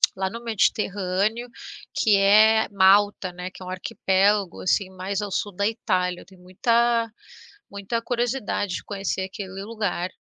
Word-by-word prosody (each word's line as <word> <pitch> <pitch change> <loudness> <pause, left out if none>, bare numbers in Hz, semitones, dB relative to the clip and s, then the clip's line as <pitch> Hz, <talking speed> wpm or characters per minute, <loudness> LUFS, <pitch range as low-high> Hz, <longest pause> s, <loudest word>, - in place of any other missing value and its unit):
lá 190 0 -2
no 230 +4 -8
Mediterrâneo, 210 0 0 0.5
que 210 -2 +3
é 215 +3 +5
Malta, 200 -1 +3
né, 180 +1 -7
que - - -14
é - - -8
um - - -7
arquipélago, 190 +1 0
assim, 185 +1 +1
mais 190 +2 -4
ao 205 - -4
sul 205 +1 -2
da 200 +3 0
Itália. 180 -5 -1
Eu - - -15
tenho 190 -2 -19
muita 230 +5 +1 0.6
muita 200 +3 -3
curiosidade 235 -5 -2
de - - -6
conhecer 195 -2 -3
aquele 190 0 -7
lugar. 205 -5 -3
200 Hz, 150 wpm, -24 LUFS, 185-220 Hz, 0.6 s, é